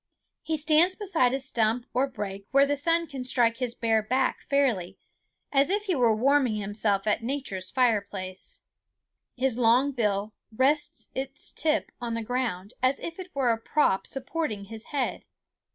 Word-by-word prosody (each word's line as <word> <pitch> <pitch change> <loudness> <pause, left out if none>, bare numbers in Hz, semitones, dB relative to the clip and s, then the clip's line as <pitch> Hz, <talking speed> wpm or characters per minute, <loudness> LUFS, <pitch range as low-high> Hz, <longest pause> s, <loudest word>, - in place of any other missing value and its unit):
He 320 - -2
stands 315 +5 +3
beside 350 - +1
a 270 - -1
stump 235 -2 0
or 260 +2 +2
brake 200 -6 -6
where 275 +1 +5
the 290 +1 0
sun 335 +3 +1
can 275 -5 -6
strike 240 -2 +3
his 245 -2 -2
bare 225 -1 +2
back 255 +4 0
fairly, 230 -10 +1 0.5
as 275 0 +3
if 410 +2 +1
he 390 -3 0
were 240 -7 +3
warming 260 0 +3
himself 205 -1 0
at 210 +1 +1
nature's 225 -7 -4
fireplace. 200 -6 -1 0.8
His 255 -1 0
long 245 +4 +4
bill 210 -4 -1 0.2
rests 290 +6 0
its 270 +2 -4
tip 310 0 0
on 235 -1 -2
the 230 - -3
ground, 230 -5 -3
as 260 +2 +2
if 335 +2 -7
it 370 -1 -7
were 260 -4 +2
a 225 - -1
prop 225 -5 +1
supporting 270 -5 -3
his 225 +2 -7
head. 280 -4 -2
250 Hz, 165 wpm, -27 LUFS, 220-280 Hz, 0.8 s, where